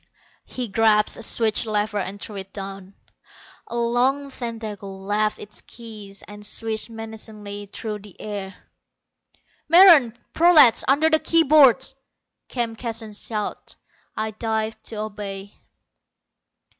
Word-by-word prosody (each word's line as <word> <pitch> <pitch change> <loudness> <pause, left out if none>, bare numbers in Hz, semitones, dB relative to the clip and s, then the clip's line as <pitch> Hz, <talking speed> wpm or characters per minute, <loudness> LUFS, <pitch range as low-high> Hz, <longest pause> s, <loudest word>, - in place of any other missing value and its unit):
He 250 -2 -4
grasped 210 0 +3
a - - -8
switch 225 -1 +2
lever 210 0 -1
and 200 +1 -4
threw 210 0 -8
it 195 0 -7
down. 195 -1 -8 0.7
A - - -7
long 255 +4 +1
tentacle 215 -6 -7
left 210 +2 0
its 210 0 -9
keys 215 -4 -11
and 205 0 -11
swished 220 +1 -2
menacingly 215 -2 -7
through 210 +1 -5
the 200 -2 -16
air. 200 -2 -6 1.1
"Meron, 325 - +7 0.2
prolats, 315 -8 +6
under 300 +4 +3
the 315 - +4
key 330 +1 +3
boards!" 270 -3 +5 0.5
came 235 -3 -2
Keston's 225 -3 -6
shout. 210 -2 -4 0.4
I 220 0 -2
dived 220 0 -3
to 225 - -6
obey. 205 -2 -6
220 Hz, 120 wpm, -23 LUFS, 205-235 Hz, 1.1 s, Meron